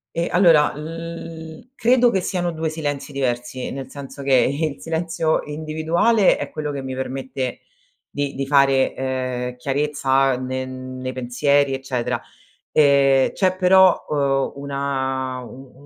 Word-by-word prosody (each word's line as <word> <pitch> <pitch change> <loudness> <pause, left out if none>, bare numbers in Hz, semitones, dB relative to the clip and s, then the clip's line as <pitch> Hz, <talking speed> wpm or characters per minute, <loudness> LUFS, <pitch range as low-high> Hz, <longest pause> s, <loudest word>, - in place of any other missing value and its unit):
Eh, 170 +1 0
allora 165 -6 +4
l 165 - -8
credo 245 +1 +4
che 190 - +1
siano 175 -1 -1
2 160 -1 -3
silenzi 145 -2 -4
diversi, 125 -1 -2
nel 135 -1 -6
senso 140 0 -9
che 135 -1 +3 0.4
il - - -21
silenzio 165 0 0
individuale 160 +8 +2
è - - -5
quello 150 -1 -4
che 140 - -5
mi 130 0 -5
permette 130 -1 -4 0.5
di 145 -1 -3
di 135 - -2
fare, 135 -1 +3
ehm, 130 -1 -3
chiarezza 135 -1 +1
ne 130 +1 -3
nei 130 0 -6
pensieri, 135 +2 +1
eccetera. 130 -2 -2 0.5
Ehm, 140 -2 +4
c'è, 185 -2 +1
però, 185 0 +5
uhm, 140 -2 0
una 135 -2 -2
u 130 +1 -12
140 Hz, 130 wpm, -21 LUFS, 130-160 Hz, 0.5 s, però